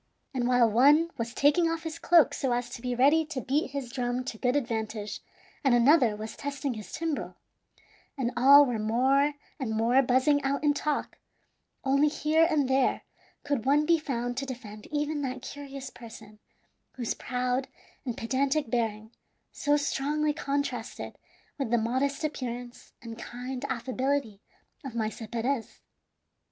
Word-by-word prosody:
And 245 -2 0
while 245 -2 +5
one 290 +9 +5
was 230 0 -2
taking 295 +6 +3
off 330 0 -3
his 325 0 -5
cloak 335 -3 +5
so 260 -3 0
as 240 0 -2
to 235 - -7
be 250 0 -2
ready 285 +6 +4
to 305 -5 -4
beat 275 +4 0
his 270 -3 -5
drum 245 0 -2
to 235 -4 -6
good 250 +1 +1
advantage, 220 -5 -2 0.4
and 270 -4 +4
another 240 -2 +5
was 215 +1 -7
testing 280 -1 -3
his 215 -2 -9
timbrel, 320 -3 -3 0.8
and 250 -3 -1
all 280 +4 +8
were 245 -4 -2
more 265 +7 +2 0.3
and 220 -5 -2
more 240 +4 +4
buzzing 265 +3 +3
out 280 +1 -1
in 295 -1 +4
talk, 295 0 -2 0.6
only 275 +2 +3
here 315 +2 +2
and 295 -5 +2
there 265 0 +2 0.4
could 280 -4 -2
one 295 +2 +4
be 335 +1 +4
found 245 -4 -3
to 275 - -2
defend 215 -5 -8
even 295 0 -2
that 260 -2 -4
curious 275 -2 -8
person, 220 -2 -12 0.5
whose 240 -3 -2
proud 250 +1 -2 0.4
and 245 -4 -4
pedantic 270 +2 0
bearing 220 -2 -1 0.4
so 290 0 +1
strongly 295 +1 0
contrasted 280 -5 -3 0.4
with 270 - -1
the 240 - +3
modest 260 +6 -1
appearance 245 -5 -5
and 230 -1 -8
kind 250 +2 -6
affability 255 -3 -2 0.4
of 265 -4 -7
Maese 220 0 -3
Perez. 240 +1 -2
260 Hz, 155 wpm, -28 LUFS, 240-285 Hz, 0.8 s, all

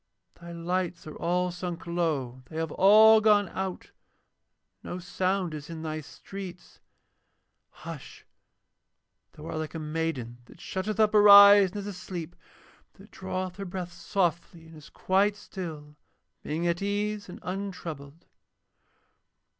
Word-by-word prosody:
Thy 170 0 -12
lights 175 0 -3
are 155 - -9
all 180 +1 0
sunk 175 -1 -6
low, 155 -8 -2
they 160 - -8
have 160 -1 -2
all 215 +3 +7
gone 205 -2 +4
out, 190 0 -5 0.9
no 180 - -6
sound 185 -1 -2
is 150 0 -8
in 165 -1 -7
thy 155 -1 -4
streets. 185 +4 -10 0.9
Hush! - - -10 1.1
Thou 150 - -12
art 160 - -5
like 155 +1 -5
a - - -3
maiden 155 -6 -3
that - - -17
shutteth 205 +3 -4
up 215 -1 +4
her 210 -1 +6
eyes 200 -1 +9
and 190 - -9
is 200 - -5
asleep, 180 -4 -7 0.6
that - - -18
draweth 185 0 -5
her 200 - -5
breath 180 -1 -6
softly 175 -2 -2
and 160 0 -14
is 155 -2 -14
quite 195 +2 +1
still, 160 -8 -8 0.5
being 160 +3 -3
at 170 +1 0
ease 205 0 -2
and - - -9
untroubled. 170 -6 -6
180 Hz, 140 wpm, -27 LUFS, 160-195 Hz, 1.1 s, eyes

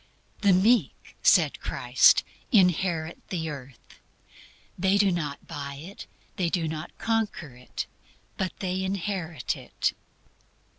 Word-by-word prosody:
"The 200 - +5
meek," 190 - +2
said - - +4
Christ, - - +4 0.3
"inherit 180 - +2
the 160 -4 -2
earth." 135 -3 -11 0.8
They 190 +2 +2
do 200 -1 +4
not 150 -5 -3
buy 140 -1 -6
it; 170 +8 -10 0.3
they 180 -3 +1
do 165 -2 0
not 155 +1 -6
conquer 215 - -1
it; 125 0 -6 0.5
but 190 -2 -2
they 185 -1 -1
inherit 185 - -2
it. - - -2
180 Hz, 115 wpm, -27 LUFS, 155-195 Hz, 0.8 s, The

